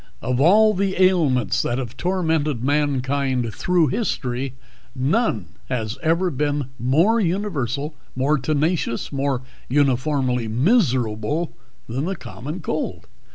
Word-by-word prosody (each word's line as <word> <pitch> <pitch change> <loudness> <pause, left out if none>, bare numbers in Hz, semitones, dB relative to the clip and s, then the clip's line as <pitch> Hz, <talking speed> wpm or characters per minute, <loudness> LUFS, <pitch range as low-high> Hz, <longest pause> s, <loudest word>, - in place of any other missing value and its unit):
Of 125 +1 0
all 215 +7 +6
the 190 -1 -1
ailments 150 - +3
that 120 - -1
have 125 -4 -5
tormented 160 -8 0
mankind 135 -4 0
through 160 +5 +2
history 130 - -2 0.4
none 130 - 0 0.2
was 115 -3 -3
ever 170 +2 +1 0.5
more 160 - +3
universal, 160 - -1 0.2
more 140 +4 +2
tenacious, 150 -1 0
more 135 -2 -1 0.3
uniformly 130 -2 +1
miserable 130 - +1 0.3
than 130 +6 -2
the 190 +2 -2
common 155 +1 -7
cold. - - -3
140 Hz, 110 wpm, -22 LUFS, 125-170 Hz, 0.5 s, all